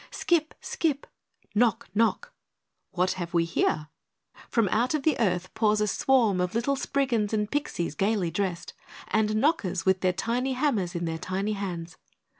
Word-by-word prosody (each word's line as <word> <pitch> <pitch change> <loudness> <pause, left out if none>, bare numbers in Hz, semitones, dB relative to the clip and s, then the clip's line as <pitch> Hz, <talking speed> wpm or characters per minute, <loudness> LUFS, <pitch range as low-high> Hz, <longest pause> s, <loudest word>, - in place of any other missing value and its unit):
Skip! 320 -3 0
skip! 295 -4 -1 0.5
Knock! 225 0 +2
knock! 230 - +1 0.6
What 185 +1 +1
have 175 -2 -4
we 165 -1 +3
here? 155 -2 0 0.6
From 230 -4 +2
out 240 +9 +1
of 295 - -2
the 310 -2 +3
earth 185 -4 0
pours 215 -1 +2
a 210 - +2
swarm 220 -4 +2
of 180 +3 -2
little 245 +4 +1
Spriggans 255 -6 0
and 210 -1 0
Pixies 280 - -2
gaily 195 0 0
dressed, 180 -3 -3 0.4
and 215 0 +1
Knockers 215 - +1
with 190 -1 +3
their 185 - +3
tiny 245 +7 -1
hammers 235 - 0
in 170 0 -2
their 160 0 -3
tiny 195 +5 -2
hands. 175 -4 -5
210 Hz, 160 wpm, -27 LUFS, 180-250 Hz, 0.6 s, we